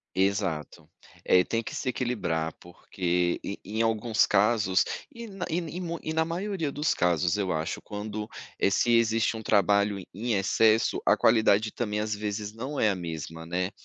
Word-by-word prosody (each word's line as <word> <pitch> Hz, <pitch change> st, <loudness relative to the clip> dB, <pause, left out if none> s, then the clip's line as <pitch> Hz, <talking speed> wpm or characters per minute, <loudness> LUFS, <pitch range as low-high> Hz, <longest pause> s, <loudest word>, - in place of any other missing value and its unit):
Exato. 95 Hz, -5 st, -1 dB, 0.4 s
Eh, 90 Hz, 0 st, +5 dB
tem 115 Hz, 0 st, -1 dB
que -, -, -7 dB
se -, -, -3 dB
equilibrar, 105 Hz, -11 st, -1 dB
porque 90 Hz, 0 st, -1 dB
e 100 Hz, -, -5 dB
em 105 Hz, +4 st, -4 dB
alguns 115 Hz, -1 st, +2 dB
casos 105 Hz, -2 st, +3 dB, 0.3 s
e 235 Hz, -2 st, -8 dB
na 195 Hz, -3 st, -5 dB
e 165 Hz, +2 st, 0 dB
e 170 Hz, +1 st, -5 dB
mui 170 Hz, -2 st, -4 dB
e 155 Hz, -, -3 dB
na 160 Hz, 0 st, +2 dB
maioria 170 Hz, -3 st, -3 dB
dos 150 Hz, +2 st, 0 dB
casos, 90 Hz, +1 st, +1 dB
eu 95 Hz, -3 st, -1 dB
acho, 80 Hz, +1 st, -2 dB
quando, 105 Hz, 0 st, -5 dB, 0.3 s
eh, -, -, +3 dB
se 120 Hz, +4 st, +3 dB
existe 115 Hz, 0 st, +2 dB
um 110 Hz, -, -6 dB
trabalho 100 Hz, -1 st, +3 dB
em 110 Hz, +4 st, -2 dB
excesso, 110 Hz, +3 st, +3 dB
a -, -, +5 dB
qualidade 110 Hz, -1 st, +4 dB
também, 105 Hz, -3 st, -2 dB
às 105 Hz, 0 st, -2 dB
vezes, 105 Hz, 0 st, -4 dB
não 130 Hz, +6 st, -5 dB
é 110 Hz, -, +4 dB
a 95 Hz, -, -1 dB
mesma, 80 Hz, -1 st, -6 dB
né. 90 Hz, +2 st, -1 dB
105 Hz, 180 wpm, -27 LUFS, 95-120 Hz, 0.4 s, Eh